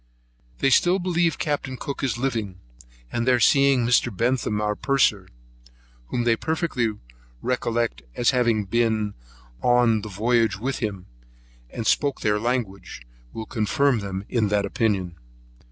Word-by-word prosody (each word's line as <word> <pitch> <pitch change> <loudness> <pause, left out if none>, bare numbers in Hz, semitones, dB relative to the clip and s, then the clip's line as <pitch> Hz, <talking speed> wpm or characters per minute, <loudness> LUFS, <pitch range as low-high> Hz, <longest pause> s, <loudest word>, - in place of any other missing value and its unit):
They 135 - +3
still 175 +8 +4
believe 175 -2 0
Capt. 145 -3 -2
Cook 140 +2 -5
is 130 -3 0
living; 115 -8 -3 0.5
and 120 +1 -2
their 125 -1 +4
seeing 135 0 +4
Mr. 120 0 +3
Bentham 115 0 0
our 105 0 0
purser, 120 -7 +1 0.8
whom 120 - -1
they 120 -1 +3
perfectly 155 -6 -1 0.5
recollected 120 - -1
as 120 - +3
having 120 -5 +1
been 110 -1 0 0.5
the 115 -4 +2
voyage 110 0 +1
with 130 +6 -3
him, 100 -7 -4 0.6
and 115 - -6
spoke 140 +2 +1
their 105 0 +1
language, 110 - -3 0.3
will 110 - -6
confirm 120 +3 +1
them 100 -1 -5
in 115 -4 +1
that 100 0 +1
opinion. 95 -5 -1
115 Hz, 135 wpm, -24 LUFS, 105-130 Hz, 0.8 s, still